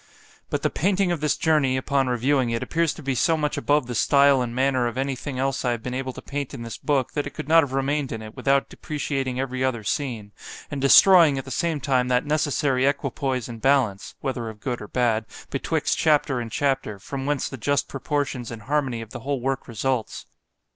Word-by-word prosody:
—But - - -2
the - - +1
painting 190 +2 +1
of 170 -4 -2
this 150 -2 +1
journey, 150 -5 +2
upon 135 0 0
reviewing 125 +1 +1
it, 115 0 -1
appears 165 -1 0
to 155 - -10
be 135 0 0
so 160 +6 +2
much 150 -1 -1
above 145 -1 +1
the 120 - -5
stile 140 +3 +4
and 120 -1 -3
manner 130 -1 +2
of 120 - -5
any 135 0 -1
thing 130 0 -6
else 135 0 -1
I 125 -2 +1
have 115 -1 -6
been 125 - -4
able 130 0 -3
to - - -10
paint 140 -1 -4
in 120 - -7
this 115 -1 -7
book, 140 -4 0
that 145 -1 -2
it 145 - -10
could - - -6
not 165 +1 +6
have 140 -4 -4
remained 135 +1 0
in 110 -1 -5
it, 110 +1 -10
without 135 +1 +2
depreciating 135 -4 -3
every 130 -1 -2
other 125 -4 -1
scene; 115 -3 -3 0.4
and 140 -2 -3
destroying 160 +1 +7
at 135 - -4
the 130 - -8
same 165 -1 -1
time 130 -3 +1
that 125 +1 +1
necessary 145 -3 +1
equipoise 135 -3 -1
and 115 -2 -8
balance, 130 -8 +1
(whether 130 -4 -3
of 110 -1 -11
good 120 +1 -3
or 105 - -7
bad) 115 -3 0 0.2
betwixt - - -1
chapter 145 -4 +2
and 115 -2 -5
chapter, 135 -7 -1
from 135 +7 -6
whence 145 -2 0
the - - -7
just 145 +4 0
proportions 135 -3 -3
and 115 -2 -8
harmony 135 -4 -1
of 110 -1 -10
the - - -6
whole 140 +3 -2
work 135 +2 -2
results. 120 0 -2
135 Hz, 225 wpm, -24 LUFS, 125-145 Hz, 0.4 s, destroying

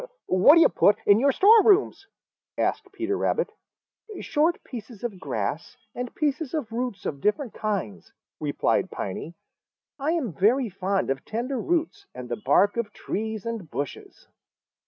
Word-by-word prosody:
"What 185 - +6
do 335 - +6
you - - +6
put 205 - +3
in 205 +1 +6
your 280 +3 +4
storerooms?" 405 - +4 0.5
asked 390 - -1
Peter 400 0 -2
Rabbit. 460 +3 0 0.7
"Short 320 +4 +1
pieces 230 -3 -9
of 215 -6 -4
grass 130 - -4 0.2
and 245 -1 -6
pieces 300 -1 -1
of 265 -8 -3
roots 235 -4 -4
of 140 -2 -4
different 220 +4 0
kinds," 185 - -4 0.3
replied - - 0
Piney. 155 - -6 0.6
"I 295 +4 0
am 270 - -2
very 225 - +2
fond 190 -3 -1
of 135 - -3
tender 245 +4 -3
roots 350 +4 -2
and 125 -1 -8
the 120 -3 -4
bark 200 - +3
of 225 -3 -2
trees 220 0 -4
and 225 -8 -5
bushes. 145 -1 -7
230 Hz, 150 wpm, -25 LUFS, 190-305 Hz, 0.7 s, What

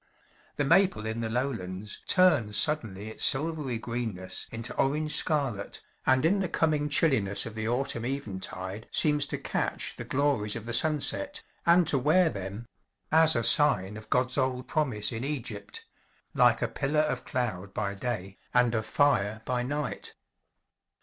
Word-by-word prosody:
The 145 - -1
maple 170 - +3
in 110 +1 -3
the 115 -1 -3
lowlands 105 -6 -4
turns 150 - +3
suddenly 110 -9 0
its 110 - -2
silvery 145 -3 +2
greenness 110 -5 -4
into 115 0 -6
orange 150 +2 0
scarlet, 135 -12 -1 0.3
and 130 +2 +3
in 195 +5 +3
the 190 -3 -2
coming 150 -2 0
chilliness 110 -10 +3
of 115 - -7
the 110 0 -4
autumn 120 -1 -1
eventide 100 -5 -5
seems 150 -2 +4
to - - -3
catch - - -2
the - - -6
glories 130 -7 +1
of 115 -2 -6
the 120 - -4
sunset, 160 - +2 0.2
and 170 -1 +5
to 140 - +2
wear 160 +6 +3
them 100 0 -7 0.5
as 160 0 +5
a 115 - 0
sign 115 -6 +4
of 110 0 -11
God's 130 +2 0
old 130 -1 -1
promise 130 -10 0
in 115 +1 -5
Egypt 115 -8 -5 0.5
like - - +3
a - - +1
pillar 150 +3 0
of 140 -5 -2
cloud 100 -7 -3
by 100 0 -3
day, 100 -3 -5 0.2
and 125 -1 +3
of 110 -2 -2
fire 110 -7 +1
by 125 -1 -1
night. 130 -3 -4
125 Hz, 155 wpm, -28 LUFS, 110-150 Hz, 0.5 s, and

